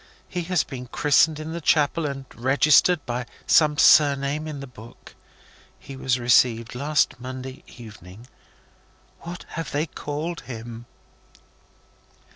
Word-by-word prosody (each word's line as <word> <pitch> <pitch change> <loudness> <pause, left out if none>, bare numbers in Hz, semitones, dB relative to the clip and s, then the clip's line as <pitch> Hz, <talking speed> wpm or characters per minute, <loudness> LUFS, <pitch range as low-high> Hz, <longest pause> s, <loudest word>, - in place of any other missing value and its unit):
He 180 - -4
has 180 -1 +1
been 125 -1 -9
christened 150 +4 +2
in 155 +1 -6
the 170 - -5
chapel, 150 +1 +2
and 135 -1 -6
registered 145 +6 +3
by 120 -1 -4 0.2
some 150 -2 +4
surname 145 0 +4
in 150 -2 -6
the 140 - -7
book. 120 -2 -15 0.6
He 135 - -11
was 130 -1 0
received 120 -1 +2
last 140 0 0
Monday 130 +1 -8
evening. 105 -2 -13 0.9
What 175 +1 -9
have 165 -4 -6
they 145 +2 -1
called 160 +2 -5
him?" 115 -1 -9
140 Hz, 125 wpm, -23 LUFS, 125-155 Hz, 0.9 s, some